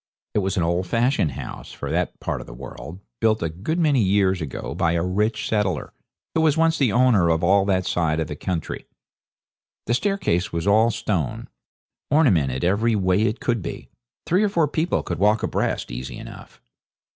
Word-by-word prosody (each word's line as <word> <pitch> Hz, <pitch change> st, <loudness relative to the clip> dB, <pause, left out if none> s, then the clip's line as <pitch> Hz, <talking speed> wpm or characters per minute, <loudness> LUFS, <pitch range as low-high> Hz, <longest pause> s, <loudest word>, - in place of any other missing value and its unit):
It -, -, +2 dB
was 95 Hz, -1 st, -1 dB
an 90 Hz, -, +2 dB
old 85 Hz, +2 st, 0 dB
fashioned 115 Hz, -, +1 dB
house 65 Hz, 0 st, -8 dB
for -, -, -5 dB
that -, -, -1 dB
part -, -, -3 dB
of -, -, -12 dB
the -, -, -10 dB
world, 70 Hz, +7 st, -9 dB, 0.2 s
built 110 Hz, -3 st, +2 dB
a 80 Hz, -, 0 dB
good 100 Hz, -, -3 dB
many 150 Hz, -7 st, +3 dB
years 95 Hz, -2 st, +2 dB
ago 75 Hz, -5 st, -5 dB
by 85 Hz, -1 st, +1 dB
a 85 Hz, -1 st, 0 dB
rich 105 Hz, +4 st, 0 dB
settler, 105 Hz, -4 st, -1 dB, 0.4 s
who 160 Hz, -, +2 dB
was 155 Hz, -1 st, +3 dB
once 165 Hz, 0 st, +3 dB
the 130 Hz, -6 st, +3 dB
owner 115 Hz, -7 st, +4 dB
of 80 Hz, 0 st, +1 dB
all 95 Hz, +2 st, +4 dB
that 95 Hz, -2 st, +1 dB
side 80 Hz, -2 st, 0 dB
of 80 Hz, -, 0 dB
the 75 Hz, -, -5 dB
country. 85 Hz, +2 st, -4 dB, 1.0 s
The 120 Hz, -, 0 dB
staircase 125 Hz, -, 0 dB
was 85 Hz, +1 st, -2 dB
all 110 Hz, +3 st, +4 dB
stone, 100 Hz, -, -2 dB, 0.6 s
ornamented 85 Hz, -, +3 dB
every 110 Hz, +6 st, +2 dB
way 95 Hz, 0 st, +2 dB
it 110 Hz, +1 st, 0 dB
could 115 Hz, -3 st, -1 dB
be. -, -, -7 dB, 0.4 s
Three 180 Hz, +4 st, +2 dB
or 210 Hz, -, +3 dB
four 170 Hz, -6 st, +2 dB
people 160 Hz, +4 st, 0 dB
could -, -, -4 dB
walk 105 Hz, +3 st, +3 dB
abreast -, -, -1 dB
easy 60 Hz, +1 st, -6 dB
enough. -, -, -11 dB
100 Hz, 190 wpm, -23 LUFS, 85-120 Hz, 1.0 s, owner